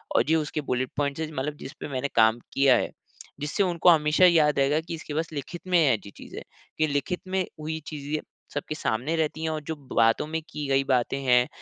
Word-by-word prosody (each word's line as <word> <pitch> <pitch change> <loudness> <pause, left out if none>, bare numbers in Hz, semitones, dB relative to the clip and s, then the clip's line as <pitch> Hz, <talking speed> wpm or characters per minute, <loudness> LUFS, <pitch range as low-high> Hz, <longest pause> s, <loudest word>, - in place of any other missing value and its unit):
और - - +5
ये 160 - +5
उसके 150 -1 -1
बुलेट 125 0 0
पॉइंट्स 145 +1 -1
हैं, 155 - -2
मतलब 145 +2 -3
जिसपे 140 +3 -8
मैंने 140 0 -2
काम 110 +1 +5
किया 135 -2 +5
है। - - -1 0.5
जिससे 150 +7 0
उनको 175 -1 +3
हमेशा 155 +1 +5
याद 155 -5 +4
रहेगा 140 +3 +3
कि 165 0 -6
इसके 155 -2 -8
पास 160 +2 -2
लिखित 145 +4 -6
में 180 -1 +4
है 145 -6 +4
ऐसी 100 -2 -5
चीज़े, - - -9 0.3
कि 155 0 +2
लिखित 145 +5 -2
में 185 -1 0
हुई 160 +1 -4
चीज़े 150 0 -4 0.3
सबके 145 +1 -3
सामने 130 +3 -1
रहती 160 0 -1
हैं 160 - 0
और 155 -1 -3
जो 160 - -1 0.2
बातों 115 +6 +3
में 160 +1 -3
की 145 -2 -5
गई 135 0 +3
बातें 125 +2 +1
हैं, 125 -1 +4
150 Hz, 215 wpm, -26 LUFS, 135-160 Hz, 0.5 s, और